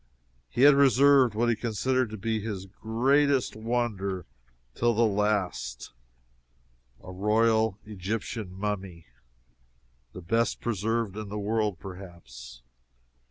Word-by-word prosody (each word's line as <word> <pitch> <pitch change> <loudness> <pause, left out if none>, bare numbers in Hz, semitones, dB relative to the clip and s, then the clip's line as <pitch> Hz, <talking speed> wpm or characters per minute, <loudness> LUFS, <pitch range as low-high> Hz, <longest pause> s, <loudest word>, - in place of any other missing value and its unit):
He 120 - 0
had 145 0 +9
reserved 140 -3 +5
what 120 +2 +1
he 120 - +2
considered 120 +3 -1
to 110 - -7
be 110 +2 -2
his 100 -3 -5
greatest 130 +7 +1
wonder 110 -5 -2 0.5
till 120 -1 +1
the 115 +2 +3
last 100 - -1 1.1
a 95 - -9
royal 110 +2 +2
Egyptian 105 0 -5
mummy, 95 -3 -5 1.1
the 90 - -8
best 115 +6 0
preserved 110 -1 -2
in 105 -1 -6
the 105 - -5
world, 105 -2 -1
perhaps. 85 -11 -11
110 Hz, 115 wpm, -27 LUFS, 95-115 Hz, 1.1 s, had